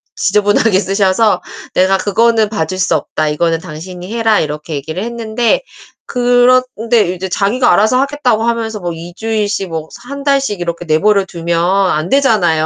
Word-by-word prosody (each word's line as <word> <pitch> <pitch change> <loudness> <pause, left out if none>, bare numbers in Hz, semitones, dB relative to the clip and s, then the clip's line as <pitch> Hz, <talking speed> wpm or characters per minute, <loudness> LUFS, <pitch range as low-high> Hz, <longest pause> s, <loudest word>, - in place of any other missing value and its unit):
지저분하게 205 +1 +2
쓰셔서 195 +2 +1 0.3
"내가 190 +1 +3
그거는 220 +2 +2
봐줄 185 -4 -3
수 190 - +2
없다. 155 - -2
이거는 165 +2 0
당신이 180 +3 -9
해라." 225 -2 +2
이렇게 150 +1 -4
얘기를 155 +7 -4
했는데 235 - -1 0.5
그런데 245 -4 +2
이제 185 +1 -5
자기가 215 +7 +1
알아서 220 +7 +3
하겠다고 275 -5 0
하면서 230 -2 -2
뭐 175 -2 -4
2 170 +2 -9
주일씩 215 -3 -2
뭐 160 -1 -5 0.2
1 280 +1 -6
달씩 275 -8 +1
이렇게 170 0 -4
내버려두면 170 0 +1 0.3
안 155 +3 -1
되잖아요. 205 - +2
205 Hz, 345 characters per minute, -14 LUFS, 175-230 Hz, 0.5 s, 내가